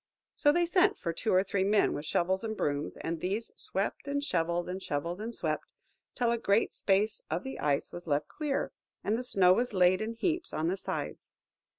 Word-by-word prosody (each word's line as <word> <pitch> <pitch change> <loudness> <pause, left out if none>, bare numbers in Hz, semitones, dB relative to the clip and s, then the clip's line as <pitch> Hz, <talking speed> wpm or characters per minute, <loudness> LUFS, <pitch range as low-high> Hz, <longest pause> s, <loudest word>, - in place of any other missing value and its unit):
So 290 - +4
they 345 +3 +3
sent 370 +4 +3
for 170 - -3
two 220 - -1
or 185 +1 +5
three 195 -1 0
men 205 +1 +3
with 150 +1 -5
shovels 185 +5 +1
and 220 -1 -3
brooms, 145 +1 -1
and 165 0 -3
these 200 +7 -2
swept 195 +8 -3
and 285 0 -1
shovelled, 170 - 0
and 185 +1 -4
shovelled 170 +5 -3
and 230 +2 -5
swept, - - -3 0.4
till 240 -2 +2
a 235 - 0
great 200 0 +2
space 205 +2 +1
of 160 +3 -1
the 265 - -6
ice 145 -2 0
was 175 0 -8
left 145 0 +1
clear, 295 -3 -2 0.3
and 210 - +1
the 245 - -2
snow 190 -7 +5
was 240 +1 0
laid 185 +1 +4
in 220 +1 -2
heaps 335 +8 -1
on 160 +2 0
the 185 - +1
sides. - - -5
195 Hz, 210 wpm, -30 LUFS, 175-235 Hz, 0.4 s, or